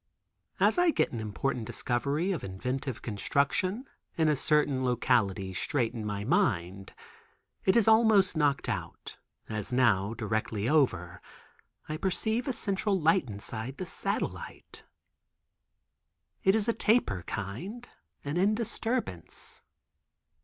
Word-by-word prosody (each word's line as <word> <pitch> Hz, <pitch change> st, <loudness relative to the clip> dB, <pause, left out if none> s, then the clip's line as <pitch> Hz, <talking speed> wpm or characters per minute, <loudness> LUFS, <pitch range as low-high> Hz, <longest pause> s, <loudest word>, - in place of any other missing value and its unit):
As -, -, +4 dB
I 355 Hz, -1 st, +4 dB
get -, -, +1 dB
an 115 Hz, -, -4 dB
important 110 Hz, +3 st, -2 dB
discovery 140 Hz, +9 st, -1 dB
of 175 Hz, -, -3 dB
inventive 125 Hz, +7 st, -4 dB
construction 140 Hz, -, 0 dB, 0.3 s
in 160 Hz, -2 st, +2 dB
a 150 Hz, -, +3 dB
certain 145 Hz, -2 st, +2 dB
locality 110 Hz, -6 st, +1 dB
straight 120 Hz, -, 0 dB
in 115 Hz, -3 st, -5 dB
my 105 Hz, -1 st, -3 dB
mind, 95 Hz, -, 0 dB, 0.7 s
it 190 Hz, -, +4 dB
is 230 Hz, -3 st, +4 dB
almost 220 Hz, -4 st, +5 dB
knocked 145 Hz, -3 st, +1 dB
out, -, -, -5 dB, 0.3 s
as 110 Hz, +2 st, -3 dB
now, 115 Hz, -4 st, +2 dB
directly 110 Hz, -1 st, -2 dB
over, 90 Hz, -, +1 dB, 0.7 s
I 155 Hz, -, -3 dB
perceive 220 Hz, -, 0 dB
a -, -, +1 dB
central 200 Hz, -2 st, +1 dB
light 165 Hz, -3 st, +2 dB
inside 110 Hz, +5 st, -4 dB
the 185 Hz, -, -4 dB
satellite. -, -, -4 dB, 1.6 s
It 190 Hz, +2 st, +4 dB
is 220 Hz, 0 st, +1 dB
a 230 Hz, -, +2 dB
taper 215 Hz, -, +2 dB
kind 175 Hz, -, -6 dB, 0.4 s
and 145 Hz, +5 st, -1 dB
in 205 Hz, +3 st, +3 dB
disturbance. 225 Hz, -, -2 dB
135 Hz, 125 wpm, -29 LUFS, -, 1.6 s, almost